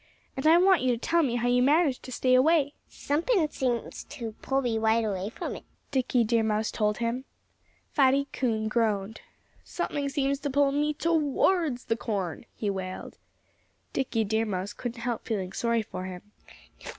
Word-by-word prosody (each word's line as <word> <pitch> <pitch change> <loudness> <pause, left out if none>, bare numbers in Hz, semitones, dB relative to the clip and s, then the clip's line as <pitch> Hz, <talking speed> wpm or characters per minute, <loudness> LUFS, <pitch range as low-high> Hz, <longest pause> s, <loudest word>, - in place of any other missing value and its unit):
And 265 +3 0
I 325 +2 +7
want 370 0 +5
you 255 - +1
to - - -2
tell 335 +8 +2
me 255 -6 0
how 240 0 0
you 245 0 +3
manage 290 0 +3
to 255 - -10
stay 255 +1 +1
away." 285 +2 +4 0.2
"Something 325 - +1
seems 245 -5 -2
to 230 -3 -6
pull 270 0 0
me 230 -3 0
right 220 +1 +2
away 195 -1 -2
from - - -5
it," - - -10 0.3
Dickie 255 -3 +2
Deer 230 +1 +2
Mouse 220 0 0
told 210 -1 0
him. 240 +3 -2 0.7
Fatty 275 -1 +3
Coon 220 -4 0
groaned. 215 -2 0 0.4
"Something 285 -1 -3
seems 275 -1 0
to 285 - -3
pull 280 0 +3
me 295 +1 0
towards 315 -2 +1
the 225 - 0
corn!" 200 -2 -3
he 210 - -3
wailed. 190 -2 -5 0.7
Dickie 245 -4 0
Deer 220 +2 0
Mouse 190 0 -3
couldn't 240 -1 -6
help 240 -1 -3
feeling 195 -4 -2
sorry 235 0 0
for 185 -4 -6
him. 180 -1 -7
245 Hz, 175 wpm, -28 LUFS, 220-280 Hz, 0.7 s, I